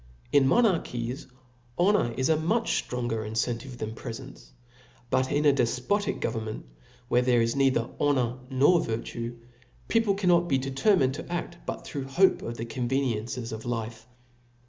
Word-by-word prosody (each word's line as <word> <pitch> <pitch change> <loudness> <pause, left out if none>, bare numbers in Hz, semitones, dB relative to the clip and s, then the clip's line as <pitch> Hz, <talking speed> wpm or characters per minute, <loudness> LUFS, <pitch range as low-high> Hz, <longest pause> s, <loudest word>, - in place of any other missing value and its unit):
In 135 -2 +5
monarchies, 140 - +1 0.5
honor 190 - +3
is 130 - 0
3 160 +1 +3
much 215 +9 0
ftronger 120 -3 -2
Jnccntive 120 +3 -2
than 110 -1 -4
prefents. - - -9 0.6
But 130 0 +1
in 150 +1 +1
a' 145 - +6
defpotic 135 - 0
government, 110 -2 -3 0.4
where 120 - +3
there 125 -1 +3
is 115 0 +1
neither 135 -4 +2
honor 130 -4 +1
nor 145 +6 +4
virtue, 115 +1 -4 0.5
people 225 -3 +3
cannot 175 -3 +3
be 135 - +2
determined 135 +2 +2
to - - -7
a& 175 - -2 0.2
but - - -5
through 140 -3 -5
hope 185 +8 +3
of 115 0 -5
the 115 - -4
conveoiencies 120 -1 -2
of 110 0 -6
life. 115 -1 -4
130 Hz, 145 wpm, -27 LUFS, 115-145 Hz, 0.6 s, a